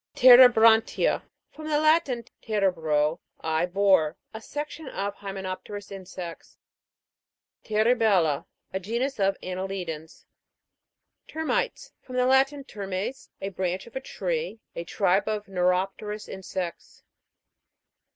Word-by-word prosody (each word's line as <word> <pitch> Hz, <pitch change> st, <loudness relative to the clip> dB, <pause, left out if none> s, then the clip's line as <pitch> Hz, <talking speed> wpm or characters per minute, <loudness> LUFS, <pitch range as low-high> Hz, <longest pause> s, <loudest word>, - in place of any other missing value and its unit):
TEREBRAN'TIA. 240 Hz, -3 st, +7 dB, 0.3 s
From 310 Hz, 0 st, -9 dB
the 300 Hz, -1 st, +2 dB
Latin, 310 Hz, -6 st, +3 dB, 0.2 s
tere 205 Hz, -4 st, +1 dB
bro, 155 Hz, -1 st, 0 dB, 0.2 s
I 160 Hz, +2 st, 0 dB
bore. 185 Hz, -4 st, +3 dB, 0.2 s
A 220 Hz, -, -7 dB
section 295 Hz, +4 st, -6 dB
of 200 Hz, +1 st, -3 dB
hyme 195 Hz, -1 st, -7 dB
nopterous 190 Hz, +1 st, -6 dB
insects. 185 Hz, -3 st, -9 dB, 1.1 s
TERIBEI/LA. 215 Hz, -, +2 dB, 0.3 s
A 190 Hz, -, -1 dB
genus 235 Hz, +8 st, -2 dB
of 195 Hz, 0 st, +2 dB
anneli 185 Hz, 0 st, -4 dB
dans. 160 Hz, -1 st, -8 dB, 1.0 s
TER'MITES. 320 Hz, +9 st, -2 dB
From 255 Hz, -, -9 dB
the 250 Hz, 0 st, +3 dB
Latin, 270 Hz, +2 st, +3 dB
termes, 200 Hz, +2 st, -5 dB
a 195 Hz, -, -2 dB
branch 185 Hz, -1 st, -3 dB
of 235 Hz, -, -16 dB
a 265 Hz, -, -3 dB
tree. 475 Hz, -, -3 dB, 0.2 s
A 170 Hz, -, -4 dB
tribe 195 Hz, +2 st, +1 dB
of 210 Hz, -1 st, -2 dB
neuropterous 195 Hz, +3 st, -1 dB
insects. 185 Hz, -2 st, -6 dB
200 Hz, 115 wpm, -26 LUFS, 185-245 Hz, 1.1 s, TEREBRAN'TIA